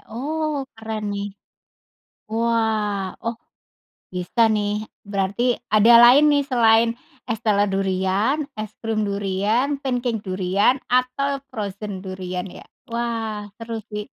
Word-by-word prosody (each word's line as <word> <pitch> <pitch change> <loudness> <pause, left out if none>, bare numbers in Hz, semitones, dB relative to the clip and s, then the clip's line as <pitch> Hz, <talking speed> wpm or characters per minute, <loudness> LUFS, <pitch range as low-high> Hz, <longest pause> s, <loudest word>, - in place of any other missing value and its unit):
Oh, 295 +3 -2
keren 220 -2 -4
nih. 200 0 -3 1.0
Wah! 220 -4 0
Oh, 230 0 -3 0.7
bisa 180 +6 +2
nih, 210 0 0 0.2
berarti 205 +5 0 0.2
ada 215 +2 +6
lain 250 +5 +8
nih, 285 -1 +3
selain 230 -2 +4 0.3
es 230 -3 -3
teler 205 -2 +2
durian, 195 +8 +1 0.2
es 215 -1 -4
krim 215 -2 0
durian, 205 +8 0
pancake 245 -4 -1
durian, 190 +5 +2 0.2
atau 255 +3 +1
frozen 200 -4 -5
durian 185 -1 -5
ya? - - -11 0.3
Wah! 225 -3 -3
Seru 230 -1 -5
sih. 210 0 -3
220 Hz, 115 wpm, -22 LUFS, 200-240 Hz, 1.0 s, lain